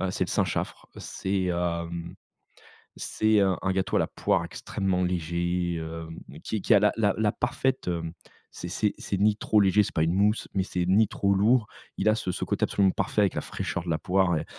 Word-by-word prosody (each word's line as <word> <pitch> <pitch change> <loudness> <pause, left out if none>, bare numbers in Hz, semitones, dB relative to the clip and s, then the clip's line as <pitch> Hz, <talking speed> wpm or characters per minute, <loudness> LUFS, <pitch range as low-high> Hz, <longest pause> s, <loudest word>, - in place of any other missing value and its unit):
heu, 95 - -1
c'est - - -1
le - - -6
Saint-Chaffre, - - -2
c'est, 95 0 -2
hem, 85 -1 -2 0.8
c'est 110 -1 +1
un 95 -3 +2
un 95 - 0
gâteau 95 +1 -1
à - - +3
la - - +1
poire - - 0
extrêmement 95 -2 -2
léger, 85 0 -1
heu, 80 0 -6 0.3
qui 110 -3 -3
qui - - +3
a 100 - +7
la 105 +1 +4
la 105 -3 +2
la 110 -1 +2
parfaite, 130 +1 -1
heu, 85 -2 -2 0.5
c'est - - -7
c'est 105 +3 0
c'est 100 - -3
ni 105 +2 +3
trop 110 - +2
léger, 100 +2 +4
c'est - - -6
pas 80 - +3
une 80 +2 +1
mousse, 105 +3 +2
mais 95 -1 +1
c'est 90 -2 -2
ni 100 +4 +4
trop 100 0 0
lourd, 110 +3 +3 0.3
il 105 - +2
a 110 - +4
ce 95 - -2
ce - - -3
côté - - -1
absolument 95 -2 +3
parfait 95 +2 0
avec 100 - +2
la - - -1
fraîcheur 85 - -4
de 90 - -6
la 80 -1 0
poire, 95 -3 +2
et 75 - -3
95 Hz, 220 wpm, -27 LUFS, 85-105 Hz, 0.8 s, a